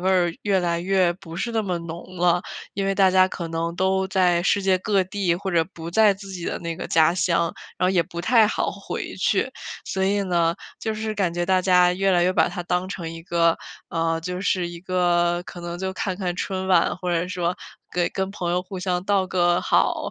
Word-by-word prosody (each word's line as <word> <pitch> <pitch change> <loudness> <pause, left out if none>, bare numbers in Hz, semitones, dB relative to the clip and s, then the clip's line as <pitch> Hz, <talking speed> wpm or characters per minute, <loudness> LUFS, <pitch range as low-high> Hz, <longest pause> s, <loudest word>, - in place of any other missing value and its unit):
味 185 - 0
儿 175 -3 +3
越 195 -3 +2
来 170 -1 0
越 185 -1 +2
不 170 -2 -10
是 235 - -2
那 225 -1 0
么 185 -4 -2
浓 170 +2 -8
了。 175 0 +3 0.3
因 195 0 -1
为 195 - +1
大 190 -1 +5
家 185 0 +5
可 170 -3 -5
能 165 +1 -2
都 190 +1 +1
在 180 -3 +2
世 200 0 +2
界 190 -1 +3
各 200 0 +1
地 185 -2 -1
或 190 +2 -4
者 165 -2 +3
不 165 0 -7
在 210 +1 +5
自 195 0 -11
己 180 -3 -6
的 - - -2
那 170 -1 -4
个 - - -5
家 160 +1 +4
乡， 170 -2 +1 0.2
然 - - 0
后 185 - +3
也 185 - +3
不 170 +1 -5
太 225 +3 +5
好 - - -1
回 - - -6
去， - - +1 0.3
所 190 0 -1
以 200 +1 +1
呢， 170 -3 +1 0.2
就 220 -1 -3
是 215 0 -3
感 180 -4 0
觉 175 0 0
大 185 0 +3
家 180 -1 +4
越 195 +1 +1
来 175 -1 +4
越 185 +1 +3
把 - - +3
它 175 - -5
当 180 +1 -1
成 165 -4 -5
一 165 - -8
个， 170 -1 +2 0.3
呃， 165 -1 0
就 180 +2 -4
是 185 -3 0
一 170 0 -8
个 175 -1 +1
可 175 - -10
能 175 0 -5
就 190 0 -2
看 190 -1 -3
看 180 -3 -2
春 190 -1 -3
晚， 175 -2 +3
或 180 -1 -3
者 170 0 0
说 180 -1 -2 0.4
给 175 -1 +1
跟 190 0 -3
朋 175 -4 -3
友 180 +1 +1
互 190 0 -7
相 180 -1 -1
道 195 -2 +2
个 175 -1 +2
好， - - +1
180 Hz, 250 characters per minute, -23 LUFS, 175-190 Hz, 0.4 s, 大